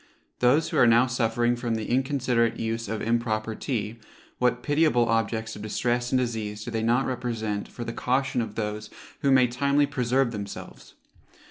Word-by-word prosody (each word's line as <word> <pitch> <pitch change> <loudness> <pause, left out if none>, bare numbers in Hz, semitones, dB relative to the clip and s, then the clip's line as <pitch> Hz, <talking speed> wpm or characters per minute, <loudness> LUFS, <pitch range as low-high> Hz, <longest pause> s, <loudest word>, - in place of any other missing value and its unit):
Those 130 +6 +3
who - - -2
are 120 - +6
now 115 +2 +5
suffering 120 -1 +1
from 120 -1 -2
the 110 -1 -3
inconsiderate 125 -3 +1
use 115 0 -2
of 110 0 -3
improper 115 -1 0
tea, 115 -2 -3 0.4
what 125 0 +1
pitiable 145 -5 +3
objects 115 0 -1
of 105 - -9
distress 120 +3 -1
and 130 - +3
disease 110 -4 -2
do 120 - -6
they 115 -1 -1
not 120 +4 +2
represent 115 -5 -3
for 120 - -7
the 115 - -5
caution 130 0 0
of 110 -2 -5
those 105 -1 -3 0.3
who 140 - +1
may 130 -2 +6
timely 140 +4 +2
preserve 130 -2 +1
themselves? 100 -3 -8
120 Hz, 170 wpm, -26 LUFS, 110-125 Hz, 0.4 s, are